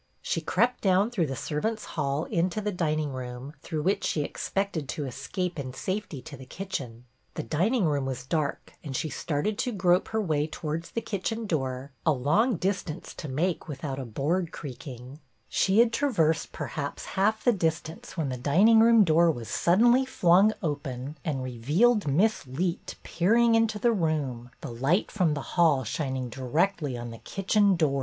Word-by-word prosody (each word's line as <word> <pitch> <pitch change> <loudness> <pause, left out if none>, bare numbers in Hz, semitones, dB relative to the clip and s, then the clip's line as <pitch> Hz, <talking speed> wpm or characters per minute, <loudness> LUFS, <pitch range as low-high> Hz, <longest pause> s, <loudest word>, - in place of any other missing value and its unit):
She - - -1
crept 250 +1 +1
down 195 +3 +3
through 180 -10 0
the 135 - -3
servants' 210 - -2
hall 140 0 -1
into 180 +1 0
the 210 0 -2
dining 155 -5 -1
room, 125 +2 -6
through 155 -2 -3
which 195 +4 +1
she 150 - 0
expected 175 -3 -3
to 150 - -3
escape 175 +6 -4
in 130 -2 -5
safety 185 -4 -4
to 150 - -9
the 130 - -11
kitchen. 130 -10 -6 0.3
The - - -3
dining 190 - +1
room 145 -3 0
was 130 -1 -4
dark, 150 +1 -2
and 140 -3 -5
she 155 - -1
started 155 +9 -2
to 250 - 0
grope 180 -3 +2
her 220 - -1
way 155 -7 0
towards 160 +1 -4
the 230 - -3
kitchen 225 +3 -3
door, 135 -6 -2
a 155 - +4
long 155 - +2
distance 185 -2 -3
to 155 - -7
make 165 +7 -1
without 135 -2 -5
a - - -3
board 160 +9 -1
creaking; 130 -2 -8 0.3
she 195 +1 +2
had 230 0 +5
traversed, 180 - +1
perhaps, 145 -1 -5
half 215 +3 +1
the 245 - +4
distance 165 -2 -3
when 155 -4 -1
the 130 - -3
dining 190 - +5
room 230 -1 +7
door 170 -1 +4
was 120 -8 -3
sud 175 - +2
denly 245 +2 +5
flung 190 -1 +4
open 140 -2 -3
and 140 -5 -2
revealed 150 - +2
Miss 180 +3 +2
Leet 170 +7 -3
peering 230 +7 +3
into 225 -1 +2
the 235 +3 +2
room, 145 - -1
the - - -6
light 140 - +1
from 175 -7 +1
the 145 - -3 0.2
hall 150 -6 +4
shining 130 +1 -2
directly 145 +3 -1
on 120 0 -6
the 115 - -10
kitchen 195 0 +2
door. 150 -5 +1
160 Hz, 180 wpm, -27 LUFS, 140-195 Hz, 0.3 s, room